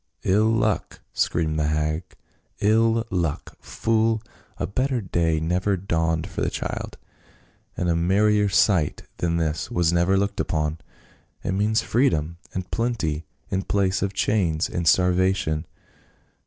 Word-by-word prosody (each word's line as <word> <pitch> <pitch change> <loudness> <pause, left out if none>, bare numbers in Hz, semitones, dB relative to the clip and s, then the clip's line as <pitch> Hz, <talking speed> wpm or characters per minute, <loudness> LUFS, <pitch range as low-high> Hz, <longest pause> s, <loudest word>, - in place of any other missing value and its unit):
" - - -42
111 110 +4 +3
luck 105 -2 -1
!" - - -47
screamed 80 -2 0
the 75 - +1
hag. 75 +1 0 0.3
" - - -40
111 115 +2 +3
luck! 85 -5 -2
Fool! 115 0 +1 0.4
A - - -1
better 130 +5 0
day 85 -5 0
never 90 +5 0
dawned 80 -3 0
for 95 -1 -5
the - - +1
child, - - -5 0.8
and 90 - -1
a 85 - +2
mer 95 +5 +2
rier 105 -1 +3
sight 95 -5 +2
than 85 -1 0
this 80 -2 -1
was 85 -1 +1
never 85 +3 +3
looked 100 +1 -1
upon. 75 0 -1 0.6
It - - -1
means 105 +3 +1
freedom 85 - +1
and 95 -1 -5
plenty 85 -11 -1 0.2
in 95 -1 +1
place 95 -1 0
of 100 -1 -2
chains 90 -7 +1
and 85 -1 -3
starvation. 90 -3 +2
90 Hz, 150 wpm, -24 LUFS, 80-105 Hz, 0.8 s, 111